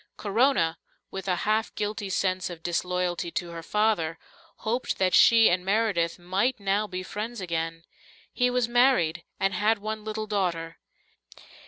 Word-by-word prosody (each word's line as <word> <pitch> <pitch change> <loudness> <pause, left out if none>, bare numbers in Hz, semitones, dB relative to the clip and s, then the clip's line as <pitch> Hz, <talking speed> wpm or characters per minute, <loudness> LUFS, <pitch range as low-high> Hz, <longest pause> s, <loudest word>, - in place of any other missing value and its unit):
Corona, 205 -6 +2 0.3
with 195 0 -6
a 180 - +2
half 215 +1 0
guilty 205 -1 -3
sense 185 -1 0
of 165 -2 -9
disloyalty 175 0 -1
to 175 -1 -3
her 165 0 -6
father, 170 -4 0 0.5
hoped 235 +4 -1
that 185 -1 +1
she 230 -1 +7
and 180 +1 +2
Meredith 195 -4 +1
might 195 +8 0
now 200 +2 0
be 185 -2 -5
friends 220 +4 -5
again. 165 -2 -3 0.5
He 250 0 +2
was 250 -1 +1
married, 240 -10 +3 0.2
and 195 0 +1
had 215 +4 +2
one 215 +1 -5
little 215 0 -4
daughter. 175 -6 -2
195 Hz, 150 wpm, -27 LUFS, 175-220 Hz, 0.5 s, she